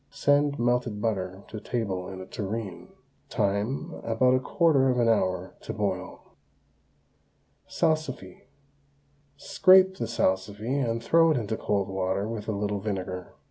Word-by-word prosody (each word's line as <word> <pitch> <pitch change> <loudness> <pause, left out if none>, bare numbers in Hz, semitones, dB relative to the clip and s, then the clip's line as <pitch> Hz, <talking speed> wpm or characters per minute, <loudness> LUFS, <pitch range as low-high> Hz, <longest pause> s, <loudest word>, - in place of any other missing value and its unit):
Send 145 0 +2
melted 120 -3 0
butter 95 -3 -2
to 110 - -6
table 100 -5 -3
in 95 -1 -7
a - - -7
tureen. 95 -3 -5 0.4
Time, 110 - -1
about 120 +3 +2
a 130 - +3
quarter 135 0 +3
of 125 - +1
an 120 -1 +3
hour 95 -4 +1
to - - -6
boil. 95 -4 -4 1.3
SALSIFY. 155 - -2 0.9
Scrape 190 +3 +5
the - - -3
salsify 100 +3 -1 0.2
and 115 0 -2
throw 165 +3 +5
it 155 - +2
into 110 -2 -2
cold 100 -3 -1
water 95 +1 -1
with 110 -2 -5
a - - 0
little 105 0 -2
vinegar. 95 -3 -5
110 Hz, 140 wpm, -27 LUFS, 95-130 Hz, 1.3 s, Scrape